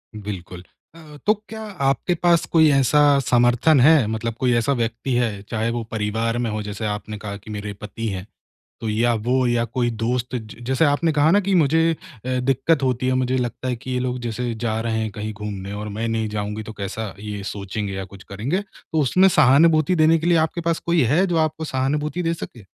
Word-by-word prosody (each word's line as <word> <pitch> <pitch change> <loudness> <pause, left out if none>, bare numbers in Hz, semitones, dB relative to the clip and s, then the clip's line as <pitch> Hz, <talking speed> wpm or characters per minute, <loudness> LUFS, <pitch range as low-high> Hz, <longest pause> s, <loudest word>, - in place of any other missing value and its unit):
बिल्कुल, 95 -4 -7 0.3
अ, 155 -3 -13
तो 215 - +5 0.2
क्या 220 0 -7 0.3
आपके 135 +6 +1
पास 170 -1 +4
कोई 160 -2 +6
ऐसा 140 +2 +4 0.2
समर्थन 120 +5 +4
है? 145 0 +6
मतलब 110 +1 -2
कोई 125 -2 +2
ऐसा 120 +4 +1
व्यक्ति 115 +1 -2
है, 115 -5 0
चाहे 110 0 -1
वो 120 0 -3
परिवार 110 +2 -1
में 120 -1 -1
हो 105 0 -3
जैसे 105 +1 -5
आपने 105 0 -4
कहा 100 -1 -6
कि 110 +2 -11
मेरे 105 0 -5
पति 110 +2 -5
हैं, 95 -2 -5 0.6
तो 110 - -3
या 115 +3 +2
वो 125 +4 +1
या 120 -1 +1
कोई 120 0 -1
दोस्त 120 +3 -2
ज 110 -4 -8
जैसे 130 +5 +2
आपने 155 +2 +2
कहा 150 +1 +3
ना 200 +4 +5
कि 195 0 0
मुझे 165 0 +3
अ, - - -5 0.4
दिक्कत 135 +4 +1
होती 130 -1 0
है 130 - +2
मुझे 130 0 +1
लगता 125 0 -3
है 125 - -1
कि 130 +2 -9
ये 125 - 0
लोग 125 0 -2
जैसे 120 0 -3
जा 110 0 -2
रहे 115 -1 -1
हैं 110 -1 -2
कहीं 105 +1 -5
घूमने 100 -2 -6
और 105 +1 -5
मैं 110 +2 -3
नहीं 110 -1 -1
जाऊँगी 105 0 -4
तो 110 - -8
कैसा 105 0 -5
ये 105 -1 -5
सोचेंगे 100 0 -4
या 95 0 -4
कुछ 100 0 -13
करेंगे। 120 - -2
तो 180 -5 -5
उसमें 185 +8 +4
सहानुभूति 155 +1 +5
देने 160 +1 +5
के 160 - -3
लिए 175 -1 +4
आपके 170 - -6
पास 165 -1 0
कोई 170 -2 +3
है 180 +5 +3
जो 175 -2 -1
आपको 155 0 0
सहानुभूति 150 +5 -1
दे 165 0 0
सके? 120 - -9
120 Hz, 215 wpm, -22 LUFS, 110-150 Hz, 0.6 s, कोई